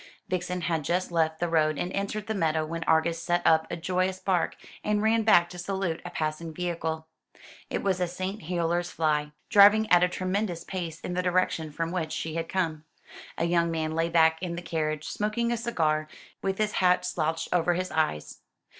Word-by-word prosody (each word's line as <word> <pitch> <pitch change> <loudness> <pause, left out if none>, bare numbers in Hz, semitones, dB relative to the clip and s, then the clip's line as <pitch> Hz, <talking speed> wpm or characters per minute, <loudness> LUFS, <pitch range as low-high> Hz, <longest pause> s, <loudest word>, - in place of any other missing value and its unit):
Vixen 180 0 -2
had 165 -2 -1
just 180 +5 -1
left 160 -1 +1
the 175 - 0
road 155 -2 +2
and 180 - -3
entered 200 +2 -2
the 220 - -2
meadow 160 -5 +1
when 165 +1 -4
Argus 165 +1 +2
set 175 +1 0
up 160 0 +4
a - - -3
joyous 185 +2 0
bark, 185 -3 0 0.3
and 210 0 +1
ran 225 +1 +3
back 190 -6 +5
to 180 - -9
salute 190 -2 -2
a 175 - -6
passing 155 0 -3
vehicle. 160 -1 -3 0.6
It - - -2
was 190 -2 0
a 180 - +2
St. 185 +4 -4
Helier's 175 +1 -1
fly, 150 -3 0 0.2
driving 210 +1 +7
at 175 -1 +7
a 180 - +4
tremendous 185 -1 -2
pace 170 -4 -5
in 180 - -4
the 180 - 0
direction 180 -3 0
from 165 +2 -3
which 165 -4 -2
she 160 - -3
had 165 0 -3
come. 160 -5 -1 0.5
A 165 - +1
young 170 0 +2
man 160 -1 -2
lay 165 +1 0
back 160 -1 +4
in 175 -2 -3
the 175 - -6
carriage, 155 -2 -2
smoking 215 +3 -1
a - - +2
cigar, 155 -10 0 0.3
with 195 0 -1
his 215 0 +1
hat 180 -2 +3
slouched 160 -2 -1
over 175 0 +2
his 185 +1 -2
eyes. 155 - -1
170 Hz, 200 wpm, -27 LUFS, 160-185 Hz, 0.6 s, driving